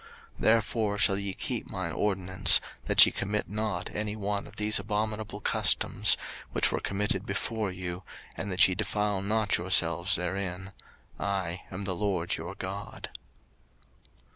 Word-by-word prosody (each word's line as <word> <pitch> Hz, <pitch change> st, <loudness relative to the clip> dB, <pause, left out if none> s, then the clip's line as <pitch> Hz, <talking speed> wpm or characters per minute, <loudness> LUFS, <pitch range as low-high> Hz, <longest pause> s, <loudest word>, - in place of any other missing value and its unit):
03:018:030 -, -, -21 dB
Therefore 110 Hz, -2 st, +2 dB
shall 100 Hz, -2 st, +3 dB
ye 100 Hz, -1 st, -3 dB
keep -, -, -3 dB
mine 95 Hz, -3 st, -3 dB
ordinance, 95 Hz, -1 st, +4 dB, 0.3 s
that -, -, +8 dB
ye -, -, 0 dB
commit 105 Hz, +1 st, -2 dB
not 105 Hz, -4 st, -3 dB
any 105 Hz, 0 st, -3 dB
one 100 Hz, -1 st, -3 dB
of 105 Hz, -, -15 dB
these 105 Hz, 0 st, +2 dB
abominable 105 Hz, 0 st, -3 dB
customs, -, -, +3 dB, 0.4 s
which -, -, +3 dB
were -, -, -1 dB
committed 100 Hz, -1 st, -1 dB
before 105 Hz, +1 st, -2 dB
you, 90 Hz, -1 st, -5 dB, 0.3 s
and 100 Hz, -, -5 dB
that 95 Hz, +4 st, +6 dB
ye 95 Hz, -, -1 dB
defile 105 Hz, +1 st, -1 dB
not 105 Hz, +1 st, +1 dB
yourselves 85 Hz, 0 st, +2 dB
therein: 90 Hz, +1 st, -3 dB, 0.5 s
I 95 Hz, -3 st, -2 dB
am 95 Hz, +2 st, -6 dB
the 95 Hz, -1 st, -2 dB
LORD 90 Hz, -3 st, -1 dB
your 85 Hz, +4 st, -7 dB
God. 100 Hz, +3 st, -6 dB
100 Hz, 145 wpm, -29 LUFS, 90-105 Hz, 0.5 s, that